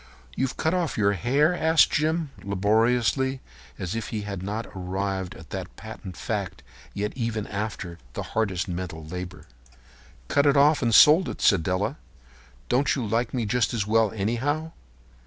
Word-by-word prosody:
"You've 135 -1 -1
cut 160 - +1
off 175 -5 -1
your 100 -2 +3
hair?" 135 - +2
asked 160 -2 +4
Jim, 155 0 0
laboriously, 115 +6 +1 0.4
as 95 +3 -4
if 115 -2 -3
he 110 - -3
had 100 -3 -5
not 105 +4 -3
arrived 95 0 -3
at 80 - -13
that 95 -2 -6
patent 105 -5 -9
fact - - -4 0.3
yet 105 +1 -2
even 115 -4 -2
after 100 -4 -5
the - - -4
hardest 100 -4 0
mental 85 -3 -5
labor. 90 +2 -7 0.8
"Cut 140 - +3
it 140 0 +4
off 145 +2 +5
and 115 -3 +2
sold 160 +5 +7
it," - - -6
said 100 -5 +4
Della. 95 - -1 0.7
"Don't 135 +2 +2
you 130 - -2
like 115 +3 0
me 120 -3 -1
just 120 +2 +1
as 105 -3 0
well, 110 0 +3
anyhow? 130 +10 -1
110 Hz, 160 wpm, -25 LUFS, 95-135 Hz, 0.8 s, sold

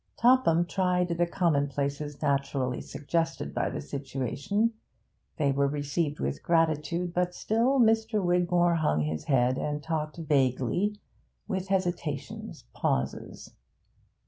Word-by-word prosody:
Topham 230 -9 +4
tried 180 0 +1
the 170 0 +1
commonplaces 145 -4 -1
naturally 140 -2 0
suggested 165 +3 -2
by - - 0
the - - -4
situation; 140 - -2 0.6
they 145 -3 +2
were 140 +1 +2
received 145 +2 -2
with 70 +1 -2
gratitude, 165 +1 +1
but 180 0 0
still 240 +5 +1
Mr. 225 -1 +3
Wigmore 175 -1 +2
hung 115 - +1
his 75 +1 -3
head 130 -2 +2
and 150 0 -3
talked 155 0 -3
vaguely, 150 - +1 0.5
with 190 0 -2
hesitations, 175 -7 -3
pauses. 65 +1 -2
160 Hz, 115 wpm, -28 LUFS, 140-180 Hz, 0.6 s, Topham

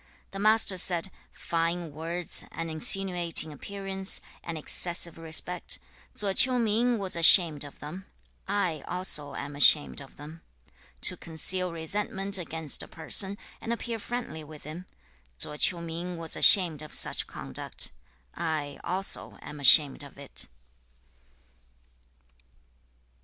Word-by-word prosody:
The 195 - -9
Master 215 -2 0
said, 175 +1 -1 0.2
'Fine 165 0 -5
words, 165 +3 -2
an 165 -1 -7
insinuating 170 -1 +5
appearance, 195 +4 -4 0.2
and 165 -1 -7
excessive 170 +2 +4
respect; 165 +2 +1 0.4
Tso 200 -2 -4
Ch'iu 250 +5 +4
ming 235 +2 -1
was 195 -4 -3
ashamed 165 -3 +4
of 145 - -14
them. 175 +6 -11 0.4
I 185 -7 -4
also 155 -6 -3
am 140 0 -9
ashamed 145 0 +4
of 135 - -16
them. 155 +3 -14 0.6
To - - +1
conceal 180 +3 +4
resentment 195 +3 -2
against 160 -3 -3
a - - -7
person, 190 +4 -2 0.2
and 230 - -7
appear 235 -1 -6
friendly 235 -9 -8
with 150 0 -15
him; 165 +5 -11 0.5
Tso 150 - -4
Ch'iu 170 +3 +1
ming 170 +2 -7
was 165 -1 -3
ashamed 170 -6 +5
of 155 - -8
such - - +1
conduct. - - -6 0.4
I 150 -3 -6
also 190 +3 -2
am 150 - -11
ashamed 140 +1 +4
of 140 -1 -12
it.' 140 -1 -6
170 Hz, 125 wpm, -25 LUFS, 155-195 Hz, 0.6 s, insinuating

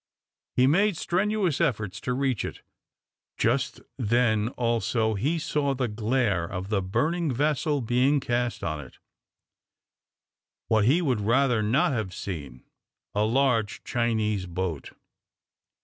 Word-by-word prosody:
He 125 - +5
made 190 +6 +3
strenuous 190 -2 0
efforts 105 -4 -1
to 125 - -1
reach 130 -3 0
it. - - -7 0.7
Just - - 0 0.2
then 110 -2 +2
also 115 -1 +1
he 135 - 0
saw, 150 -3 0
the 130 -1 -1
glare 110 -3 0
of 95 0 -5
the 105 -3 +1
burning 150 - 0
vessel 145 +2 0
being 125 +5 +2
cast 120 -2 -1
on 75 -3 -2
it, 65 - -15 1.7
what 110 -2 +3
he 155 +9 +3
would 125 -8 +1
rather 120 +2 +2
not 115 +8 +2
have 110 -8 -3
seen 70 -10 -6 0.5
a 105 +1 +2
large 115 -2 +1
Chinese 110 -5 0
boat. 85 -4 -4
120 Hz, 125 wpm, -26 LUFS, 105-140 Hz, 1.7 s, He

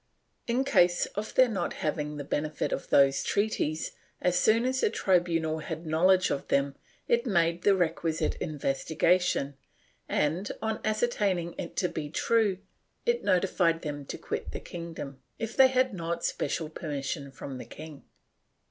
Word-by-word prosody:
In 245 +3 +2
case 180 -10 +4
of 210 +3 -5
their 255 0 +7
not 195 -7 -2
having 150 -1 -2
the 145 - -4
benefit 150 +2 -2
of - - -4
those 135 -1 +5
treaties, 180 -7 0 0.3
as 180 0 +1
soon 225 +6 +4
as 260 0 0
the - - +3
tribunal 170 -6 +1
had 160 +2 -6
knowledge 185 +4 +3
of 140 - -2
them, 140 0 +1 0.3
it 235 +2 +2
made 170 -4 +2
the 200 +1 +4
requisite 165 -2 0
investigation 150 +1 0 0.5
and, 165 +7 0
on 220 -1 -2
ascertaining 205 -6 0
it 170 - -5
to 180 - +1
be 150 -4 -5
true, 215 +3 +2 0.5
it 475 0 +1
notified 175 -2 +2
them 145 -2 -4
to - - -5
quit - - -5
the - - -4
kingdom, 165 -5 -7 0.2
if 225 0 -4
they 265 - +8
had 255 -2 +2
not 170 -2 -3
special 160 - -1
permission 145 -2 -4
from 135 -1 -7
the - - -7
king. 150 +4 -10
170 Hz, 155 wpm, -29 LUFS, 150-205 Hz, 0.5 s, they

